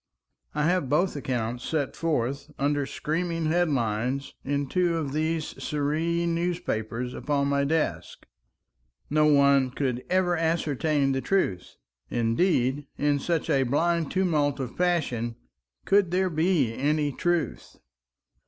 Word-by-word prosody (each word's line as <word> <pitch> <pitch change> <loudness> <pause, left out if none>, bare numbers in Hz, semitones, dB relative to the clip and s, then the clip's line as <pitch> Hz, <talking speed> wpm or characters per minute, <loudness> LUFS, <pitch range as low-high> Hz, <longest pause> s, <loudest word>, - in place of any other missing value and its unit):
I 150 - +1
have 175 -4 +1
both 175 +6 +2
accounts 120 -3 -3
set 150 -4 -2
forth, 140 -3 -1
under 145 0 0
screaming 165 +2 -2
headlines, 135 -6 0
in 140 0 -1
two 175 +3 +1
of 145 -4 -3
these 155 +1 -2
sere 145 -1 -1 0.3
newspapers 165 -9 -2
upon 140 +2 0
my 140 0 +2
desk. 160 +2 -2 0.9
No 150 0 +4
one 140 -2 +4
could 125 -1 -2
ever 180 -1 +2
ascertain 155 -3 +1
the 135 0 0
truth. 100 - -1 0.3
Indeed, 130 +3 +1
in 145 -1 +1
such 165 +2 -1
a 135 - +3
blind 165 +5 +1
tumult 155 -7 +1
of 125 -3 -5
passion, 140 -10 0 0.5
could 195 -2 +4
there 185 +1 +1
be 160 -7 +2
any 145 +3 0
truth? 175 +3 -2
145 Hz, 125 wpm, -26 LUFS, 135-170 Hz, 0.9 s, No